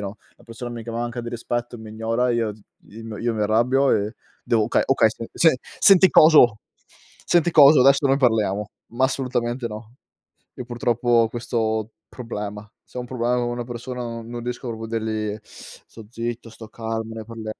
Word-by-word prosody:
no, 100 +1 -6 0.2
la - - -22
persona 120 +1 -8
mi 120 -1 -7
che 115 - -7
manca 120 +1 -4
di 120 - -7
rispetto, 120 0 -4
mi 110 -1 -10
ignora, 115 +3 -1
io 115 -3 -1
z 105 - -20 0.3
io 110 0 -9
io 120 0 -1
mi 105 - -1
arrabbio 125 +6 +2
e 105 +3 0 0.3
devo 115 -2 +1
"Okay, 115 - +1
okay. 135 -4 +4
Sen-sen 130 +8 +1 0.2
senti 190 -2 +7
coso, 145 -12 +6 0.7
senti 175 0 +3
coso, 150 -3 +7
adesso 140 +2 +5
noi 135 - +3
parliamo." 105 -6 +1 0.2
Ma 130 +2 +1
assolutamente 125 -2 -2
no. 110 +2 -10 0.6
Io 125 - -7
purtroppo 120 0 -2
ho 115 -2 +4
questo 110 -2 -2 0.2
problema. 105 -3 -7
Se - - -10
ho - - -2
un 125 - -7
problema 125 0 -1
con 120 -1 -1
una 120 0 -4
persona 125 +1 -6
no 115 -1 -6
non 120 +1 -7
riesco 125 +1 -5
proprio 115 -1 -6
a - - -7
dirgli: 110 -1 -3
"Sto 110 -2 -14
zitto, 115 0 -5
sto 110 0 -12
calmo, 115 0 -5
ne 110 -1 -7
parlia" 110 -1 -7
120 Hz, 190 wpm, -22 LUFS, 110-125 Hz, 0.7 s, senti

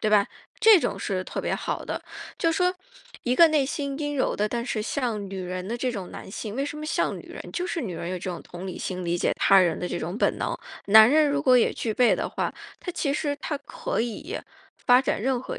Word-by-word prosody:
对 215 - +1
吧， 205 -1 +5 0.3
这 435 -6 +7
种 - - -2
是 185 -2 -2
特 - - -5
别 - - 0
好 - - -3
的。 - - -4 0.4
就 330 - +2
说 360 +2 +2 0.5
一 250 +1 0
个 335 -1 +8
内 295 -4 +2
心 280 -1 -3
阴 290 -1 -2
柔 260 - +1
的， 210 +1 0
但 235 +1 -2
是 220 -4 -2
像 230 -3 -2
女 195 - -6
人 185 +1 -4
的 235 - -2
这 250 0 -1
种 195 -5 -6
男 - - -9
性， 215 +2 -5
为 275 - 0
什 290 - -5
么 305 - -5
像 - - 0
女 - - -9
人？ - - -9
就 360 0 -2
是 335 -4 -2
女 185 -7 -4
人 170 +1 -5
有 185 - -2
这 185 +1 -4
种 175 - -6
同 175 +2 -8
理 185 - -6
心， 185 -1 -4
理 175 +1 0
解 - - +1
他 195 -1 +6
人 170 -3 +2
的 180 - -3
这 - - -3
种 175 +6 -4
本 - - +1
能。 - - -2 0.3
男 220 +3 +8
人 305 0 +5
如 285 +1 0
果 255 -3 +6
也 - - +3
具 225 - -3
备 245 +2 +4
的 - - -2
话， - - -2 0.2
他 360 - -5
其 300 -5 -1
实 290 -1 -1
他 295 -3 -2
可 280 - -3
以 240 - -4 0.3
发 250 +1 +4
展 - - -1
任 260 +2 +1
何 - - -6
245 Hz, 275 characters per minute, -26 LUFS, 195-290 Hz, 0.5 s, 个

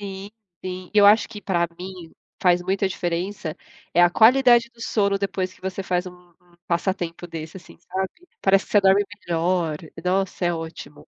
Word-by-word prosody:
Sim, 195 0 -7 0.3
sim. 185 0 -6
Eu 205 -1 +7
acho 215 +2 +5
que 210 -2 -9
pra 175 -4 0
mim, 180 -2 -9 0.3
faz 180 -1 +4
muita 190 +2 0
diferença, 175 -1 -3 0.4
é 175 - +6
a 175 - +6
qualidade 240 +2 +5
do 235 - -19
sono 200 -3 +1
depois 190 -2 -2
que - - -22
você 190 +1 -4
faz 180 0 -1
um 180 -1 -13 0.2
um - - -26
passatempo 175 -1 -2
desse, 160 +1 -8
assim, 185 - -14
sabe. 190 0 -3 0.3
Parece 195 0 +3
que - - -20
você 205 - +6
dorme 195 +1 +4 0.2
melhor. 170 -1 0 0.3
Nossa, 185 0 0
é 175 0 +1
ótimo. 160 -3 -8
185 Hz, 175 wpm, -23 LUFS, 175-195 Hz, 0.4 s, Eu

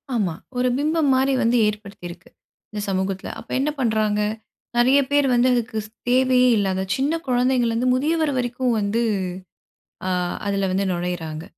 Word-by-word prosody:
ஆமா. 190 -7 0 0.2
ஒரு 250 0 +2
பிம்பம் 305 0 +1
மாரி 265 +1 +2
வந்து 235 +1 +3
ஏற்படுத்தியிருக்கு. 195 -4 -7 0.4
இந்த 210 -1 -4
சமூகத்தில. 190 0 -2
அப்ப - - -14
என்ன 290 +3 +1
பண்றாங்க? 215 -3 +1 0.6
நிறைய 260 +4 +5
பேர் 285 -1 +4
வந்து 245 +1 +4
அதுக்கு 225 -2 -1 0.3
தேவையே 255 0 +4
இல்லாத 190 -1 0
சின்ன 280 +4 0
குழந்தைங்கள்லருந்து 245 -1 +1
முதியவர் 310 +2 +1
வரைக்கும் 245 -1 0
வந்து, 210 +3 0 1.1
அ - - -1 0.4
அதில 200 -1 0
வந்து 195 +1 0
நுழையிறாங்க. 175 -2 -4
235 Hz, 135 wpm, -22 LUFS, 195-260 Hz, 1.1 s, நிறைய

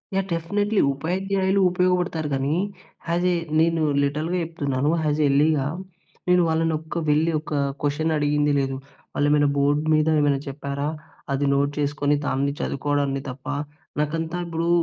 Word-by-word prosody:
Yeah! 195 0 +1
Definitely. 205 +5 0
ఉపాధ్యాయులు 190 +6 0
ఉపయోగపడతారు 180 -3 0
గానీ, 135 +3 0 0.5
హ్యసే 175 +2 +1 0.3
నేను 165 0 +2 0.2
లిటరల్‌గా 155 +5 -1
చెప్తున్నాను. 145 -4 -1
హ్యాజ్ 150 0 0
ఎల్లీగా. 145 0 +3 0.6
నేను 180 0 +5
వాళ్ళనొక్క 160 0 -1
వెళ్ళి, 155 +3 +3
ఒక 155 - -7 0.3
కొషనడిగింది 150 0 +1
లేదు. 135 -1 -1 0.4
వాళ్ళేమేనా 145 0 +3
బోర్డ్ 145 +1 +2
మీద 155 0 +3
ఏమైనా 145 -2 +2
చెప్పారా? 140 +1 -3 0.4
అది 140 +1 0
నోట్ 140 +1 +2
చేసుకొని, 145 0 +1
దాన్ని 140 +1 0
చదువుకోవడాన్ని 140 -1 -1
తప్ప 130 +1 -9 0.5
నాకంతా 160 +3 -1
ఇప్పుడు 165 0 -2
150 Hz, 120 wpm, -24 LUFS, 145-165 Hz, 0.6 s, నేను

